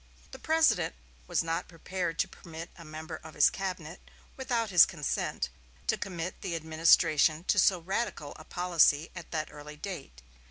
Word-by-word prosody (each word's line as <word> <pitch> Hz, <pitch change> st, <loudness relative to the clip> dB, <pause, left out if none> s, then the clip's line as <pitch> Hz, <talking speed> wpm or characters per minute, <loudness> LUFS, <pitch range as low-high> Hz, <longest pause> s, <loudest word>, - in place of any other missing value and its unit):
The -, -, -9 dB
President 320 Hz, -, +2 dB, 0.3 s
was -, -, +1 dB
not 165 Hz, 0 st, -2 dB
prepared 175 Hz, 0 st, -4 dB
to -, -, +1 dB
permit 165 Hz, 0 st, -10 dB
a 170 Hz, -, -12 dB
member 155 Hz, +1 st, -7 dB
of 160 Hz, 0 st, -12 dB
his 150 Hz, -, +6 dB
cabinet, 180 Hz, -4 st, -5 dB, 0.3 s
without 235 Hz, -5 st, -1 dB
his 175 Hz, -2 st, +9 dB
consent, 145 Hz, -, -2 dB, 0.4 s
to -, -, +2 dB
commit 180 Hz, -2 st, -5 dB
the 180 Hz, -4 st, -3 dB
administration 160 Hz, -1 st, +4 dB
to -, -, +2 dB
so 190 Hz, -, +5 dB
radical 175 Hz, -4 st, -3 dB
a -, -, -11 dB
policy 165 Hz, -3 st, +3 dB
at 170 Hz, -2 st, -8 dB
that 155 Hz, -1 st, -3 dB
early 150 Hz, 0 st, -9 dB
date. 145 Hz, -, -7 dB
165 Hz, 160 wpm, -30 LUFS, 155-185 Hz, 0.4 s, his